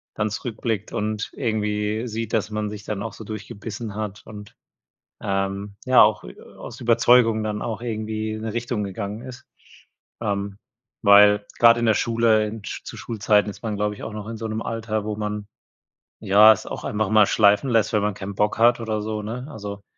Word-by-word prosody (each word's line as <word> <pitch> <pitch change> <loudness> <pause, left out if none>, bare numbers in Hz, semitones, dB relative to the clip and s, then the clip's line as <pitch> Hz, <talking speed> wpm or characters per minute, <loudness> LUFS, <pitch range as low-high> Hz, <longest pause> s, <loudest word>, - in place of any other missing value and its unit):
dann 110 0 0
zurückblickt 110 -1 -4
und 105 0 -3
irgendwie 105 -1 -1
sieht, 115 -1 -5
dass 110 -1 0
man 105 -1 -3
sich 105 -1 -8
dann 105 -2 -4
auch 115 - -5
so 110 - -10
durchgebissen 105 +1 -7
hat 105 -1 -5
und, 105 -2 -11 0.6
ähm, 100 0 -3
ja 130 -1 +6
auch, 105 0 +2
äh, - - -11
aus 120 - -11
Überzeugung 115 -1 +4
dann 105 -1 -3
auch 115 0 -4
irgendwie 110 -1 -3
in 110 - -6
'ne 110 -1 -4
Richtung 120 -2 -2
gegangen 100 +2 -5
ist. 130 0 -10 0.8
Ähm, 100 -1 -2 0.5
weil 105 0 +6
gerade 115 0 +7
in 120 - +1
der 110 - +5
Schule, 115 -2 +2
in 105 -1 -7
sch - - -6
zu - - -9
Schulzeiten 105 -2 +1
ist 105 - -10
man, 110 -2 -2
glaube 105 0 -1
ich - - -11
auch 110 - -6
noch 105 0 -7
in 115 0 -6
so 110 +1 -4
'nem 110 +1 -3
Alter, 110 -2 -3
wo 105 -1 -3
man, 105 -1 -4 0.7
ja, 105 +3 +7
es 105 - -8
auch - - -7
einfach 105 -1 -1
mal 105 -2 +5
schleifen 105 +4 +3
lässt, 115 -3 +2
wenn 105 - +3
man 105 0 0
keinen 95 +1 -7
Bock 105 +2 0
hat 120 +1 +5
oder 110 -2 -2
so, 105 0 -4
ne? 125 +5 -5
Also, 100 -4 -7
110 Hz, 200 wpm, -23 LUFS, 105-115 Hz, 0.8 s, gerade